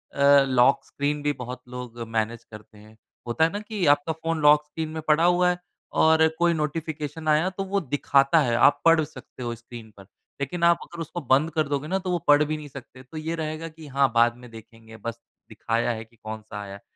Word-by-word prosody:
अ, - - -3 0.3
lock 130 +1 +3
screen 145 +1 -2
भी 145 - +1
बहुत 125 -1 -7
लोग 125 -1 -8
मैनेज 115 +1 -2
करते 105 +1 -13
हैं। 110 +1 -17 0.3
होता 120 +7 +1
है 165 - +3
ना? 205 - -4
कि 210 -3 -3
आपका 145 +2 +3
फ़ोन 165 0 -3
लॉक 150 0 +6
स्क्रीन 155 +1 -5
में 160 0 -5
पड़ा 155 +2 +4
हुआ 180 0 +4
है 180 - 0 0.5
और 160 0 +5
कोई 170 0 +3
नोटिफ़िकेशन 155 0 -4
आया 155 +4 +3
तो 190 +1 -5
वो 195 +1 -1
दिखाता 140 +1 +2
है 120 -5 0
आप 120 +4 +4
पढ़ 165 -1 +5
सकते 130 -3 -11
हो 120 -1 -3
स्क्रीन 115 -1 -12
पर। 100 - -12 0.4
लेकिन 170 +5 -3
आप 170 0 +5
अगर 170 -1 -9
उसको 165 +2 -5
बंद 150 +5 +4
कर 155 -2 0
दोगे 145 +1 -2
ना 190 +3 0
तो 185 -1 -4
वो 175 - 0
पढ़ 145 +1 +6
भी 155 +1 -2
नहीं 150 -1 -9
सकते। 130 -1 -12
तो 130 +5 -11
ये 160 +2 -3
रहेगा 155 0 -4
कि 160 -1 -12
हाँ, 135 -1 +2
बाद 120 0 +4
में 125 0 -13
देखेंगे 115 0 -14
बस 115 +1 -6 0.3
दिखाया 115 +1 -1
है 110 -1 -5
कि 115 +1 -28
कौन-सा 110 -1 -8
आया 100 -1 -8
है। 100 - -11
145 Hz, 225 wpm, -25 LUFS, 120-160 Hz, 0.5 s, लॉक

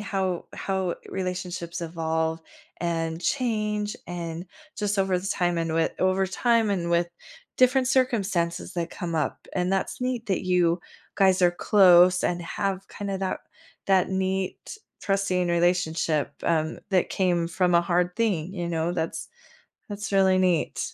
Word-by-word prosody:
how 190 -4 -2
how 190 -2 -2
relationships 180 -2 -4
evolve, 160 -1 -2 0.4
and 165 -1 -2
change, 210 -1 -1
and 170 0 -5 0.3
just 205 -1 -1
over 190 -1 +1
the 185 - -6
time, 175 -3 0
and 165 -1 -1
wi 160 0 +1
over 185 +1 +2
time, 230 +1 +2
and 175 -4 -1
with 170 0 +2 0.5
different 255 0 +4
circumstances 205 -10 0
that 170 -1 -2
come 175 -4 -5
up, 155 - -3
and 180 0 0
that's 195 +5 -1
neat 250 -2 -2
that 195 -3 0
you 180 -1 +2 0.4
guys 190 -1 +4
are 175 - +6
close 180 -1 +5
and 175 0 0
have 195 +2 -3
kinda 200 -1 -4
that 190 -1 -2 0.5
that 190 -2 +3
neat 190 - -2 0.3
trusting 195 -3 0
relationship, 170 -3 +1
um, 160 -1 0
that 185 -2 +2
came 175 -3 +1
from 175 +1 +1
a 170 - +6
hard 175 +1 0
thing, 190 -6 0
you 175 -2 -3
know, 165 0 -1
that's 165 -2 -3 0.6
that's 205 0 -5
really 190 -1 +4
neat. 180 -4 +1
180 Hz, 145 wpm, -26 LUFS, 170-195 Hz, 0.6 s, are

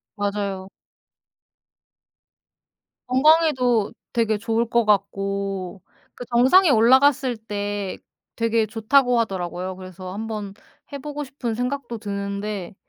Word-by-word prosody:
맞아요. 200 -2 -3 2.4
건강에도 260 -5 +3 0.2
되게 225 -3 +1
좋을 230 +1 0
것 235 -1 +2
같고 195 -2 -1 0.3
그 245 - -8
정상에 260 +10 +5
올라갔을 260 +1 +4
때 205 -2 -4 0.4
되게 230 -1 +1
좋다고 240 +3 +2
하더라고요. 185 -3 -3
그래서 185 0 -9
한번 210 -1 -5 0.4
해 280 - -4
보고 295 +1 -5
싶은 250 -4 -4
생각도 250 0 -3
드는데 200 -2 -5
220 Hz, 230 characters per minute, -23 LUFS, 200-250 Hz, 2.4 s, 정상에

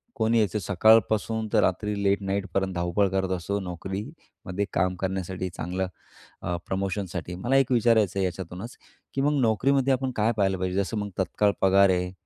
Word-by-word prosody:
कोणी 110 +1 +2
यायचं 105 -2 +1
सकाळपासून 110 +3 +3
ते - - +5
रात्री 100 +2 0
लेट 100 +1 +2
नाईटपर्यंत 95 -1 -1
धावपळ 85 +3 +1
करत 95 0 -1
असतो, 100 +4 -2
नोकरीमध्ये 95 - -6
काम 90 +1 +1
करण्यासाठी, 95 -1 -3
चांगल्या 90 +3 -2 0.5
अ, 90 - -2
प्रमोशनसाठी. 95 -2 -3
मला 120 +9 -1
एक 135 -1 +2
विचारायचं 110 -5 +3
आहे 95 - +2
याच्यातूनच 95 +5 -6 0.4
की 135 - -1
मग 145 +1 +2
नोकरीमध्ये 135 +4 +2
आपण 130 0 -1
काय 110 +2 +2
पाहिलं 95 -2 +2
पाहिजे, 95 0 -2
जसं 110 +3 -4
मग 105 -1 -3
तत्काळ 100 +2 +2
पगार 95 +1 +5
आहे 90 0 0
100 Hz, 160 wpm, -26 LUFS, 95-110 Hz, 0.5 s, ते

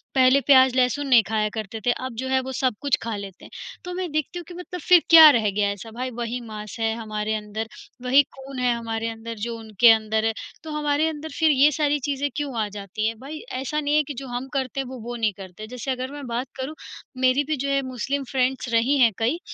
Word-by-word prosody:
पहले 260 +1 +5
प्याज़, 260 -2 +5
लहसुन 255 +3 +1
नहीं 245 -4 +6
खाया 215 -1 +1
करते 220 +1 -5
थे, 245 - +4
अब 255 0 -4
जो - - -3
है 265 0 +2
वो 260 0 -6
सब 255 -4 +1
कुछ 285 -2 +2
खा 225 -1 -3
लेते 200 -2 -9
हैं। - - -14 0.3
तो 360 - -5
मैं 360 -2 -4
देखती 310 +3 -2
हूँ - - -8
कि 360 - -10
मतलब 360 0 -7
फ़िर 355 +2 +6
क्या 320 -2 +11
रह 230 -7 +3
गया 205 +1 +1
ऐसा? 205 +3 -8
भाई 250 +3 -4
वही 235 +1 -3
मांस 215 +2 -7
है 225 0 +1
हमारे 215 -1 -3
अंदर, 215 +1 -5 0.3
वही 260 +3 +5
खून 270 0 -8
है 250 -1 +2
हमारे 225 -1 -3
अंदर 225 0 -7
जो 230 -1 -5
उनके 225 +1 +5
अंदर 220 0 +1
है, 225 - +1 0.3
तो 315 - -7
हमारे 295 +1 +1
अंदर 315 0 -5
फिर 320 -1 +5
ये 285 +2 +5
सारी 295 0 +2
चीज़ें 285 +1 -2
क्यों 285 -5 -3
आ 210 - -1
जाती 200 - -5 0.2
हैं। 225 0 -3
भाई 280 +5 -8 0.2
ऐसा 270 +3 -2
नहीं 290 0 0
है 305 - +4
कि 290 - -6
जो 270 +1 -7
हम 245 +1 -4
करते 270 -1 -2
हैं, 270 - -2
वो 255 0 -8
वो 240 +2 -6
नहीं 220 -3 0
करते। 195 +2 -9
जैसे 250 +3 -4
अगर 255 +1 -4
मैं 290 -1 -8
बात 240 +2 -3
करूँ, 265 +4 -5 0.4
मेरी 260 +2 +3
भी 305 +2 -1
जो 275 +2 -2
है 275 0 +2
मुस्लिम 260 +3 -3
फ्रेंड्स 260 -1 0
रही 240 +5 +3
हैं 235 -3 +6
कई, 245 +9 0
255 Hz, 245 wpm, -24 LUFS, 225-285 Hz, 0.4 s, क्या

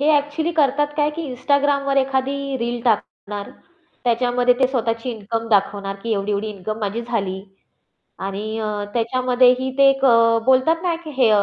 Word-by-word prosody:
हे 300 +2 +3
ॲक्चुअली 295 +3 0
करतात 295 -2 +2
काय 295 0 +2
की 335 - -3
Instagramवर 280 +1 +1
एखादी 270 +1 0
रील 240 0 -2
टाकणार 205 -2 -2 0.5
त्याच्यामध्ये 245 +1 +2
ते 260 - +5
स्वतःची 230 -1 -2
इन्कम 225 +1 -4
दाखवणार 200 -1 +1
की 230 -1 -2
एवढी-एवढी 205 +1 -1
इन्कम 215 +2 -5
माझी 210 +3 -2
झाली 200 -5 -3 0.8
आणि 210 +3 -4
अ, 220 - -2 0.3
त्याच्यामध्येही 250 +2 +2
ते 275 0 +7
एक 270 0 -1
अ, 230 -2 +5
बोलतात 265 +6 +3
ना 350 -2 0
की 310 - -7
हे 250 -4 +4
अ, 205 -1 +4
245 Hz, 160 wpm, -21 LUFS, 220-275 Hz, 0.8 s, ते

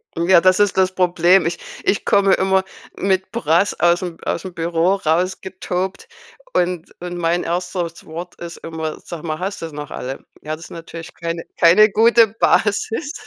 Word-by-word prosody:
Ja, 170 +2 +5
das 185 +2 +3
ist 205 -2 +2
das 185 0 +3
Problem. 180 0 +4
Ich 170 - -1 0.3
ich 200 - 0
komme 200 -2 +4
immer 190 0 +2 0.3
mit 190 0 0
Brass 195 -4 +1
aus 175 0 +3
'm 175 -3 -5
aus 170 - -3
'm 185 - -7
Büro 170 +2 +1
rausgetobt 185 - -2 0.5
und 175 -2 -1
und 175 0 -5
mein 175 +1 0
1. 175 0 -3
Wort 170 +3 -8
ist 170 -1 -8
immer: 160 -1 -5
„Sag 170 -3 -8
mal, 155 -2 -3
hast 195 +2 -4
du 165 - -4
sie 150 - -13
noch 150 -1 -7
alle?“ 130 +2 -6 0.2
Ja, 155 +1 -4
das 165 - -12
ist - - -14
natürlich 165 0 -9
keine 165 0 -4 0.2
keine 185 +6 +7
gute 230 +2 +5
Basis. 225 +6 0
180 Hz, 175 wpm, -20 LUFS, 165-190 Hz, 0.5 s, keine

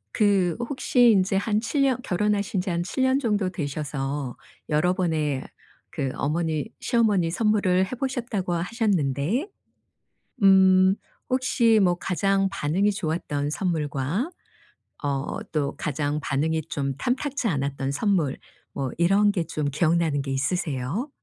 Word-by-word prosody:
그 195 -5 +2
혹시 245 0 +3
인제 195 -1 +2
한 210 +2 +1
7 275 +5 0
년 260 -2 +2
결혼하신 205 -1 0
지 185 +1 -3
한 170 0 0
7 260 +8 +1
정도 210 -7 0
되셔서 145 -4 -4 0.3
여러 155 +4 +2
번의 155 -7 0 0.5
그 135 - -2
어머니 155 +1 -1
시어머니 210 -8 +2
선물을 190 -2 +2
해 - - -11
보셨다고 240 -9 -2
하셨는데 185 - 0 0.9
음 190 0 +6 0.3
혹시 245 -3 +3
뭐 180 -2 +3
가장 195 +2 +1
반응이 195 +3 +1
좋았던 155 -5 -2
선물과 160 - -1 0.7
어 140 -1 -2 0.2
또 145 -2 -1
가장 145 0 -2
반응이 160 +4 0
좀 140 -3 -3
탐탁지 260 - -1
않았던 140 -5 -1
선물 165 -4 0 0.4
뭐 135 -2 -3
이런 195 +5 +4
게 180 -5 -1
좀 155 -2 -3
기억나는 160 -1 +1
게 135 -1 -4
있으세요? 145 - -2
180 Hz, 245 characters per minute, -25 LUFS, 150-210 Hz, 0.9 s, 음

